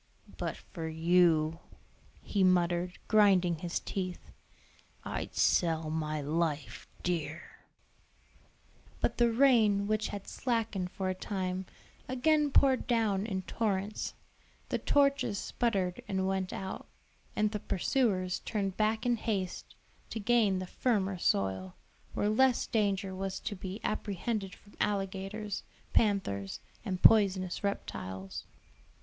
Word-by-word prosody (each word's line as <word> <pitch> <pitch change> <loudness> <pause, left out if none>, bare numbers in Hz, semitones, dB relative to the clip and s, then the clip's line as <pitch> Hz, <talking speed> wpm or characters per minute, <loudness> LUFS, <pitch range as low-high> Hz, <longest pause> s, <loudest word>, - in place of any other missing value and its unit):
"But - - -2
for 165 -3 -7
you," 165 -1 +3 0.6
he 200 -2 +1
muttered, 180 -1 +2
grinding 190 -5 +4
his 170 0 -2
teeth, 185 -2 -5 0.7
"I'd - - -4
sell 160 -2 +2
my 155 -1 -1
life 150 -4 -2 0.2
dear." 170 -2 -2 1.6
But - - -1
the 235 -1 +5
rain, 225 -5 +4
which 215 +1 0
had 200 -1 -6
slackened 225 -7 -1
for 190 0 -3
a - - +1
time, 185 -1 -3 0.4
again 295 +3 +2
poured 265 -2 +4
down 220 -4 +1
in 190 -3 -2
torrents, 205 0 -2 0.5
the - - 0
torches 275 -7 +2
sputtered 190 -5 -1
and 190 -1 0
went 190 -1 -1
out, 190 0 -5 0.5
and 210 0 +2
the 210 - -2
pursuers 190 -3 0
turned 195 -3 -2
back 220 +2 +1
in 240 -1 +2
haste 200 -5 -3 0.3
to 225 - -4
gain 215 -3 +3
the 185 - -3
firmer 195 -3 0
soil, 95 - 0 0.4
where 205 - +1
less 250 +4 +3
danger 200 -3 0
was 190 0 -3
to 205 - -3
be 190 +2 -6
apprehended 205 -1 -2
from 205 - -20
alligators, 200 +1 -2 0.3
panthers, 190 - +1 0.2
and 185 -5 -4
poisonous 190 -4 +5
reptiles. 95 - -4
195 Hz, 120 wpm, -31 LUFS, 180-215 Hz, 1.6 s, the